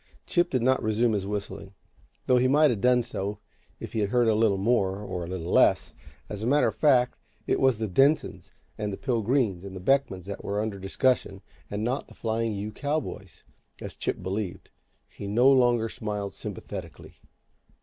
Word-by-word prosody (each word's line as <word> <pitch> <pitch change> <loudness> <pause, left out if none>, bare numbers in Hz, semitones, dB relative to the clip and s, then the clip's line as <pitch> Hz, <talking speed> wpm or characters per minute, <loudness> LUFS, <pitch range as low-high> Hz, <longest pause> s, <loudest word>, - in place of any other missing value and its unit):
Chip 175 0 +1
did 130 -3 0
not 130 +1 +3
resume 110 +2 +1
his 100 -2 -2
whistling, 100 -1 -5 0.5
though 125 - +4
he 130 - +3
might 150 +2 +5
have 105 -5 -3
done 125 -1 +4
so 105 -3 -4 0.4
if - - -8
he 110 - -1
had 100 -2 0
heard 120 +1 +2
a 110 - +4
little 105 -2 +2
more, 100 -2 +1
or 95 -4 -5
a - - -6
little 90 -1 -5
less. - - +3 0.3
As 105 -1 -6
a 110 - -2
matter 145 +3 +4
of - - -7
fact, 125 -5 +3 0.3
it - - +1
was 130 -4 +3
the 110 0 -2
Densons, 140 - +1 0.3
and 105 -1 -2
the 95 - -5
Pilgreens, 115 -6 0
and 95 -1 -8
the - - -6
Beckmans 100 -4 +1
that 100 0 -7
were 100 +1 -2
under 105 -2 -3
discussion, 95 0 0 0.3
and 105 +1 -3
not 125 +4 -2
the - - -16
Flying 115 0 -1
U 105 +2 -4
cowboys, 140 - -4 0.4
as - - -7
Chip - - -3
believed. 95 0 -4 0.4
He 100 - -9
no 120 +7 +4
longer 120 -3 +3
smiled 105 -3 -4
sympathetically. - - -8
110 Hz, 190 wpm, -27 LUFS, 100-125 Hz, 0.5 s, might